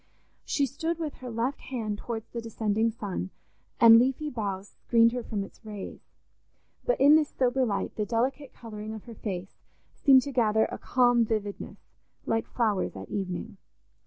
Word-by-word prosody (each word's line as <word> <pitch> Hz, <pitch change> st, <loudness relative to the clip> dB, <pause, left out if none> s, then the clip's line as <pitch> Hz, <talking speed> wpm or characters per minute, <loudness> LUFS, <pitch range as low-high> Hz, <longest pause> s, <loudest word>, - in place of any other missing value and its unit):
She 285 Hz, -, +1 dB
stood 320 Hz, +5 st, -3 dB
with 315 Hz, -3 st, -4 dB
her 255 Hz, -, -8 dB
left 235 Hz, +4 st, -2 dB
hand 220 Hz, -5 st, -4 dB
towards 225 Hz, -2 st, -5 dB
the 235 Hz, -, -5 dB
descending 220 Hz, 0 st, 0 dB
sun, 205 Hz, -4 st, -4 dB, 0.5 s
and 230 Hz, -2 st, +9 dB
leafy 270 Hz, +4 st, 0 dB
boughs 200 Hz, -4 st, -4 dB
screened 230 Hz, -1 st, +4 dB
her 250 Hz, +1 st, -3 dB
from 210 Hz, -3 st, -3 dB
its 195 Hz, -, -14 dB
rays; 210 Hz, -3 st, -7 dB, 0.8 s
but -, -, +1 dB
in 285 Hz, +2 st, +7 dB
this 310 Hz, -2 st, +3 dB
sober 260 Hz, 0 st, +2 dB
light 200 Hz, -2 st, -2 dB
the 210 Hz, -, 0 dB
delicate 260 Hz, +4 st, -1 dB
colouring 215 Hz, -1 st, -8 dB
of 215 Hz, -, -9 dB
her 235 Hz, -, -10 dB
face 195 Hz, -4 st, -6 dB, 0.4 s
seemed 265 Hz, -3 st, +5 dB
to 285 Hz, -, -5 dB
gather 220 Hz, -4 st, +3 dB
a -, -, -6 dB
calm 245 Hz, -2 st, +3 dB
vividness, 210 Hz, -2 st, -3 dB, 0.5 s
like 225 Hz, 0 st, 0 dB
flowers 215 Hz, -5 st, 0 dB
at -, -, -8 dB
evening. 195 Hz, +2 st, -4 dB
230 Hz, 165 wpm, -28 LUFS, 210-255 Hz, 0.8 s, and